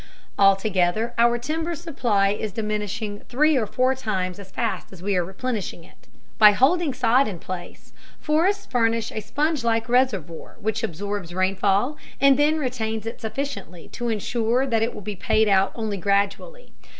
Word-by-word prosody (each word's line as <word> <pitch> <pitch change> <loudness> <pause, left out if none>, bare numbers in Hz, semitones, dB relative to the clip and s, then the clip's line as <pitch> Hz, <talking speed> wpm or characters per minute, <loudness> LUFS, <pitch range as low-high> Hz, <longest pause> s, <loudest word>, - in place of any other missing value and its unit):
Altogether 195 +2 +2
our 235 0 +4
timber 320 +7 -3
supply 245 - 0
is 210 +1 -2
diminishing 210 0 -3
three 300 +5 +3
or 230 -5 +1
four 255 +4 +2
times 195 -8 -3
as 195 -1 -11
fast 230 +3 -3
as 185 -2 -12
we 200 0 0
are 180 - +2
replenishing 195 -1 -4
it. 180 - -21 0.3
By 210 -1 +9
holding 300 - +3
sod 250 +1 +3
in 195 -5 -5
place, 175 +1 -8 0.3
forests 345 +7 +1
furnish 230 -2 0
a 215 - -4
sponge 295 +5 -1
like 225 0 +1
reservoir 235 - 0
which 220 0 -2
absorbs 190 0 -4
rainfall 195 +8 +1 0.2
and 275 -1 +6
then 295 +3 +3
retains 225 -6 -3
it 225 - -6
sufficiently 225 - -5
to 240 -1 -4
insure 230 +3 0
that 230 -4 +1
it 225 - -1
will - - -7
be 210 0 -5
paid 215 +4 +2
out 195 -1 +3
only 220 -3 -3
gradually. 200 - -1
220 Hz, 160 wpm, -23 LUFS, 200-255 Hz, 0.3 s, By